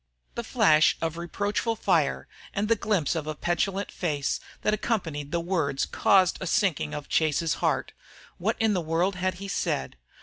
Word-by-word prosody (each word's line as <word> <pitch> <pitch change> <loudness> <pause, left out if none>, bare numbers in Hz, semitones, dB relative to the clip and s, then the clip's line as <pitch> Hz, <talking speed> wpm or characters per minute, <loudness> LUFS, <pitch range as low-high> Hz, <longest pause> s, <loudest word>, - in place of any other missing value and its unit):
The 235 - -4
flash 180 - +4
of 165 -1 -2
reproachful 205 +6 -1
fire 165 -9 +1 0.3
and 205 +2 0
the 230 - +4
glimpse 200 -8 0
of 160 -3 -3
a 155 - -3
petulant 185 +4 -1
face 145 -6 -1 0.2
that 210 - +2
accompanied 165 -10 -2
the 170 - +1
words 165 -6 0
caused 190 -2 +3
a 190 - -3
sinking 170 - +1
of 150 -1 -6
Chase's 160 0 +1
heart. - - 0 0.5
What - - 0
in 220 -1 +3
the 180 - 0
world 170 +4 0
had 185 +1 -1
he 195 +2 -7
said? 65 - -2
175 Hz, 170 wpm, -27 LUFS, 155-200 Hz, 0.5 s, flash